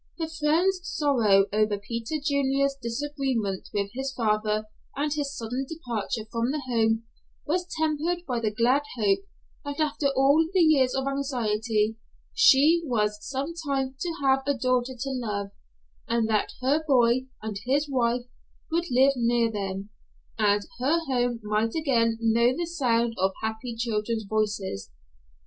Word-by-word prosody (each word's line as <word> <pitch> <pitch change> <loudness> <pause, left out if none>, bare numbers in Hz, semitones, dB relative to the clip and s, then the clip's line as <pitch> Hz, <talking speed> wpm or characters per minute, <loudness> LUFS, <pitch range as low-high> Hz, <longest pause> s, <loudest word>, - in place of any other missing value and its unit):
Her 325 -2 -2
friend's 325 +4 +1
sorrow 235 - +3
over 215 -1 +2
Peter 230 +7 -4
Junior's 275 -1 +1
disagreement 240 -5 -2
with 200 -1 -2
his 270 +1 -3
father 215 -3 0 0.3
and 290 +1 0
his 285 -2 -3
sudden 245 +4 -3
departure 235 -7 -4
from 230 +1 0
the 290 +1 -2
home 225 -2 +1 0.4
was 355 +3 -1
tempered 320 +3 0
by 250 -5 -1
the 225 -2 0
glad 235 +6 +2 0.2
hope 205 -3 +2 0.4
that 285 +1 -5
after 295 -1 +1
all 275 +3 +4
the - - +5
years 290 -6 +4
of 265 0 -1
anxiety, 225 -5 0 0.4
she 320 -4 +6
was 210 -7 0
some 275 +7 -4
time 270 -1 0
to 345 - -2
have 270 0 +4
a 285 - +2
daughter 255 0 0
to 275 +3 -3
love, 210 -6 -3 0.6
and 230 -1 +1
that 215 -1 0
her 285 +5 +2
boy 255 -1 +3 0.2
and 215 -2 -4
his 285 +3 +2
wife 245 -3 +1 0.5
would 335 +1 +1
live 265 +2 +4
near 235 -1 +2
them, 195 -1 -4 0.4
and 205 -2 +2 0.2
her 280 +7 +2
home 245 -3 0
might 215 +2 0
again 235 -8 +2
know 230 +1 +3
the 345 - -1
sound 235 -8 +1
of 190 +1 +2
happy 220 +2 -3
children's 225 -1 -1
voices. 205 - -2
245 Hz, 150 wpm, -26 LUFS, 220-280 Hz, 0.6 s, she